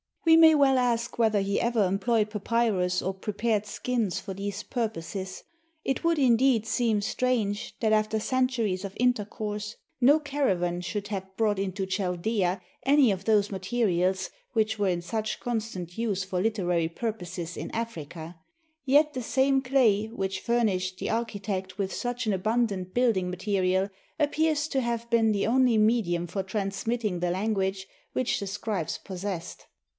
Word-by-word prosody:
We 325 Hz, 0 st, +7 dB
may 320 Hz, -1 st, +8 dB
well 275 Hz, -2 st, +4 dB
ask 240 Hz, 0 st, 0 dB
whether 220 Hz, -3 st, +3 dB
he 200 Hz, +1 st, 0 dB
ever 235 Hz, -3 st, +2 dB
employed 210 Hz, +3 st, +1 dB
papyrus 210 Hz, -4 st, +1 dB
or 190 Hz, -, -1 dB
prepared 210 Hz, +2 st, -1 dB
skins 230 Hz, -2 st, -1 dB
for 195 Hz, -, -6 dB
these 200 Hz, +2 st, -4 dB
purposes. 195 Hz, -5 st, -4 dB, 0.4 s
It 270 Hz, -, -1 dB
would, 335 Hz, -1 st, +2 dB
indeed, 250 Hz, -3 st, +4 dB
seem 225 Hz, -1 st, +1 dB
strange 220 Hz, -2 st, -1 dB
that, 220 Hz, -2 st, +3 dB
after 215 Hz, 0 st, +2 dB
cen 255 Hz, +3 st, +1 dB
turies 215 Hz, -7 st, -2 dB
of 195 Hz, -1 st, -5 dB
intercourse, 210 Hz, -3 st, -1 dB, 0.2 s
no 280 Hz, +5 st, +6 dB
caravan 195 Hz, -, 0 dB
should 205 Hz, +3 st, -4 dB
have 190 Hz, -2 st, -5 dB
brought 210 Hz, -3 st, +1 dB
into 195 Hz, 0 st, -2 dB
Chaldaea 190 Hz, 0 st, -1 dB, 0.2 s
any 275 Hz, -4 st, +5 dB
of 190 Hz, 0 st, -4 dB
those 210 Hz, -2 st, +3 dB
materials 190 Hz, -2 st, 0 dB, 0.2 s
which 220 Hz, -2 st, +1 dB
were 200 Hz, -, +2 dB
in 175 Hz, -2 st, 0 dB
such 215 Hz, +3 st, -3 dB
constant 215 Hz, -7 st, -4 dB
use 210 Hz, -4 st, -1 dB
for 185 Hz, -1 st, -2 dB
literary 180 Hz, -6 st, +1 dB
purposes 180 Hz, -4 st, -5 dB
in -, -, -5 dB
Africa; 170 Hz, -7 st, -6 dB, 0.5 s
yet 295 Hz, +3 st, +4 dB
the 255 Hz, -2 st, -4 dB
same 270 Hz, +2 st, +2 dB
clay 250 Hz, -6 st, +3 dB
which 195 Hz, -4 st, -3 dB
furnished 195 Hz, -6 st, 0 dB
the -, -, -3 dB
architect 205 Hz, -4 st, -3 dB
with 195 Hz, -2 st, -2 dB
such 245 Hz, 0 st, -3 dB
an 215 Hz, -, +1 dB
abundant 200 Hz, -2 st, 0 dB
building 225 Hz, -7 st, +2 dB
material 190 Hz, 0 st, 0 dB, 0.3 s
appears 310 Hz, 0 st, +1 dB
to 270 Hz, -3 st, 0 dB
have 235 Hz, -1 st, -2 dB
been 225 Hz, -2 st, +4 dB
the 200 Hz, -, 0 dB
only 245 Hz, 0 st, +3 dB
medium 215 Hz, -6 st, +2 dB
for 180 Hz, +3 st, -3 dB
transmitting 200 Hz, +1 st, -2 dB
the 175 Hz, 0 st, 0 dB
language 190 Hz, 0 st, -1 dB, 0.3 s
which 255 Hz, -, 0 dB
the 200 Hz, -, -4 dB
scribes 195 Hz, -3 st, -3 dB
possessed. 185 Hz, -2 st, -6 dB
210 Hz, 155 wpm, -27 LUFS, 190-235 Hz, 0.5 s, may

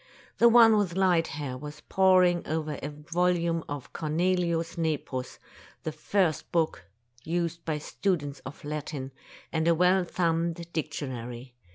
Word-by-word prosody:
The 235 Hz, -, +7 dB
one 225 Hz, -2 st, +7 dB
with 190 Hz, -5 st, 0 dB
light 180 Hz, -4 st, +3 dB
hair 145 Hz, -4 st, -5 dB
was 150 Hz, +1 st, -8 dB
poring 185 Hz, -2 st, +4 dB
over 155 Hz, -2 st, -2 dB
a -, -, -3 dB
volume 170 Hz, +2 st, 0 dB
of 145 Hz, -2 st, -6 dB
Cornelius 170 Hz, +1 st, 0 dB
Nepos, 150 Hz, -6 st, -2 dB, 0.5 s
the 155 Hz, -, -2 dB
first 180 Hz, -1 st, 0 dB
book 165 Hz, -, 0 dB, 0.4 s
used 170 Hz, 0 st, -2 dB
by 155 Hz, -2 st, -1 dB
students 150 Hz, -3 st, -2 dB
of 135 Hz, -, -10 dB
Latin, 145 Hz, -2 st, -4 dB, 0.4 s
and 160 Hz, 0 st, 0 dB
a 170 Hz, -, +5 dB
well 180 Hz, +2 st, +4 dB
thumbed 170 Hz, -1 st, -1 dB
dictionary. 130 Hz, -5 st, -5 dB
165 Hz, 135 wpm, -28 LUFS, 150-175 Hz, 0.5 s, The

